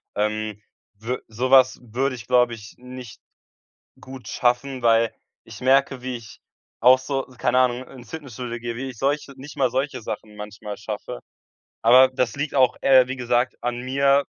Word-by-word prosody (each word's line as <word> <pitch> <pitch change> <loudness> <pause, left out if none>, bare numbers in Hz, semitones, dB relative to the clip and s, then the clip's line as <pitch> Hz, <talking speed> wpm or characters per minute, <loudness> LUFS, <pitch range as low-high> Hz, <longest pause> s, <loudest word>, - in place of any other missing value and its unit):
Ähm, 105 0 -2 0.4
wü 125 +3 -3
so 125 +4 -3
was 130 -1 +6
würde 125 +3 -2
ich 115 - -11
glaube 125 -1 +3
ich 105 -1 -11
nicht 125 -3 -11 0.8
gut 130 -1 -11
schaffen, 125 +1 0
weil 115 -1 +3 0.3
ich 115 +1 -12
merke 135 +1 +3
wie 130 -1 -4
ich 110 -4 -13 0.4
auch 130 +2 +7
so, 135 0 -3
s 125 - -18
keine 130 - +2
Ahnung, 125 0 +1
ins 120 -4 -13
Fitnessstudio 125 -6 -6
gehe, 120 0 -5
wie 135 +2 -4
ich 120 - -13
solche 140 0 -1
nicht 140 +3 -11
mal 130 -3 +2
solche 130 0 -2
Sachen 105 -1 -7
manchmal 105 0 -8
schaffe. - - -6 0.6
Aber 130 +3 +7
das 125 -2 -2
liegt 145 +1 -3
auch, 130 -2 +4
äh, 130 -2 +6
wie 135 +1 -5
gesagt 120 0 0
an 120 0 -2
mir, 140 +2 +2
125 Hz, 175 wpm, -23 LUFS, 115-130 Hz, 0.8 s, auch